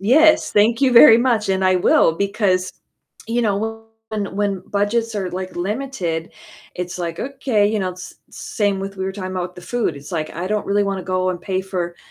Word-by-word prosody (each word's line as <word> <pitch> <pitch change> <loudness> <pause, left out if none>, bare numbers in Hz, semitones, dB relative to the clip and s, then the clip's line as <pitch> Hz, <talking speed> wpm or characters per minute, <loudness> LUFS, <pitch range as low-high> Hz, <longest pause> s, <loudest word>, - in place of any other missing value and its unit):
yes, 310 +9 +4
thank 225 +4 +3
you 255 -2 +4
very 230 -1 +9
much, 235 -4 +1
and 190 0 0
I 185 0 +4
will, 170 -2 +4
because, 200 -2 0 0.6
you 240 +1 0
know, 205 -3 +1 0.5
when 205 -3 -4
when 200 -2 -1
budgets 220 +3 0
are, 190 -3 -2
like, 185 0 -6
limited, 180 -5 -3 0.5
it's 180 0 -4
like, 170 -1 -4
"Okay," 260 -6 0
you 215 0 0
know, 185 -1 -1
s 180 - -10 0.2
same 205 -3 -2
with 195 0 -6
we 190 - -3
were 190 - -3
talking 185 -2 -6
about 180 -1 -3
with - - -26
the 180 - -10
food, 235 -11 -1
it's 145 +5 -11
like, 155 -2 -2
I 175 +3 -5
don't 210 0 -1
really 205 0 +2
wanna 195 -2 -2
go 185 0 -1
and 175 -1 -5
pay 190 0 -2
for, 175 -3 -4
195 Hz, 210 wpm, -20 LUFS, 185-220 Hz, 0.6 s, very